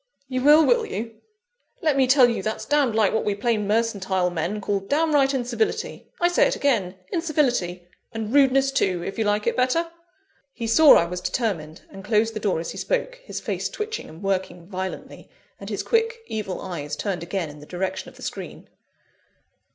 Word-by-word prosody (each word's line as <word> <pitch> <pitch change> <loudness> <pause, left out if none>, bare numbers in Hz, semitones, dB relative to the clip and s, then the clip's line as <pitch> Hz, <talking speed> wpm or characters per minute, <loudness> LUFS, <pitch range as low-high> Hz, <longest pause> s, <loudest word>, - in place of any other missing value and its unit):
"You 255 -1 -2
will, 300 +3 +7
will 480 -1 +3
you? 225 - -6 0.6
Let 305 -3 +3
me 265 -1 +3
tell 260 -1 +6
you 235 -4 -1
that's 215 +3 -3
damned 285 -6 +2
like 215 -3 +3
what 220 - +1
we 205 - 0
plain 210 -1 0
mercantile 195 -5 0
men 175 +5 -2
call 200 0 -1
downright 285 +5 +2
incivility. 260 - -2
I 345 - +4
say 350 - +4
it - - -1
again 210 -10 0 0.2
incivility; 245 - 0 0.2
and 225 0 -4
rudeness 270 -1 +4
too, 185 -10 0
if 195 - -5
you 220 - +1
like 210 0 +1
it - - +1
better." 330 +7 +1 0.6
He 230 - -5
saw 290 +7 +7
I 170 - +4
was 180 +1 -5
determined, 175 -8 -3
and 195 - -10
closed 220 +2 +1
the 215 - -4
door 200 -6 0
as 165 - -4
he - - -7
spoke, - - -1
his - - -6
face - - -3
twitching 435 0 -5
and 160 +5 -12
working 185 -3 -2
violently, 185 0 -6 0.3
and - - -8
his - - -3
quick, 455 0 0
evil 210 - -4
eyes 150 -5 -5
turned 175 +3 -3
again 170 -2 -3
in 150 - -13
the 150 - -13
direction 185 +1 -3
of - - -19
the - - -13
screen. - - -7
220 Hz, 190 wpm, -24 LUFS, 185-275 Hz, 0.6 s, will